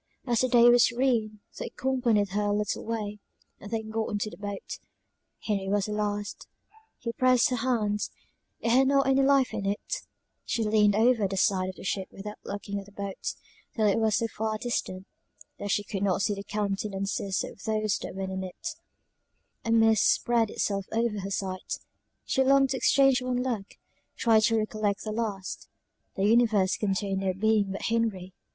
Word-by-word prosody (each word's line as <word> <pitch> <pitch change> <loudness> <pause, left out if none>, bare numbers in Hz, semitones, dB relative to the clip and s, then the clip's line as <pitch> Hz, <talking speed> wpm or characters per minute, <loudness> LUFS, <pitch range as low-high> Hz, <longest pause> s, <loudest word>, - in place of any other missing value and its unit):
As 240 -3 +1
the 255 - +2
day 240 -1 +6
was 240 0 +7
serene, 230 -4 0 0.2
they - - -3
accompanied 245 -6 +1
her 205 +2 -1
a 205 - +1
little 210 -1 -2
way, 210 -2 -4 0.4
and 200 - -9
then 220 -1 -3
got 220 0 -1
into 210 0 -2
the - - -11
boat; 205 -1 -6 0.6
Henry 195 -3 -2
was 200 -1 +1
the 210 - -5
last; 205 -1 -3 0.5
he 235 - -4
pressed 255 0 +3
her 250 - 0
hand, 220 -4 0 0.5
it 230 - +1
had 260 +2 +5
not 275 0 +3
any 270 0 +3
life 270 -1 +3
in 200 - -2
it; 205 - -2 0.4
she 230 - -1
leaned 210 -1 +3
over 225 -1 +3
the 195 0 -4
side 185 -1 +2
of 190 - -7
the - - -11
ship 190 0 -2
without 210 +2 -8
looking 200 0 -4
at 195 - -10
the - - -15
boat, 200 -1 -5 0.4
till 220 -3 +2
it 205 +1 +3
was 220 -2 +2
so 230 - +1
far 220 0 -3
distant, 195 -5 -3 0.5
that 205 - -4
she 205 - +1
could 195 -1 -5
not 195 -1 +1
see 205 - +1
the 200 0 -6
countenances 200 -1 -2
of - - -9
those 215 -1 0
that - - -7
were 195 - -3
in 190 0 -3
it: 185 -1 -6 0.9
a 230 - -1
mist 225 -2 +5
spread 235 -2 +1
itself 195 -2 -2
over 225 -2 0
her 195 0 -5
sight 190 -1 -3 0.5
she 265 - +2
longed 270 0 +4
to 265 - 0
exchange 270 -1 +4
one 250 0 -1
look 225 -6 -3 0.4
tried 225 -2 +4
to 225 +1 +3
recollect 215 -1 -1
the 215 - -4
last; 210 -4 -4 0.5
the 195 - 0
universe 215 -4 +4
contained 195 -1 -1
no 190 -1 0
being 210 0 +2
but 195 - -5
Henry! 215 -6 -1
210 Hz, 185 wpm, -28 LUFS, 200-230 Hz, 0.9 s, was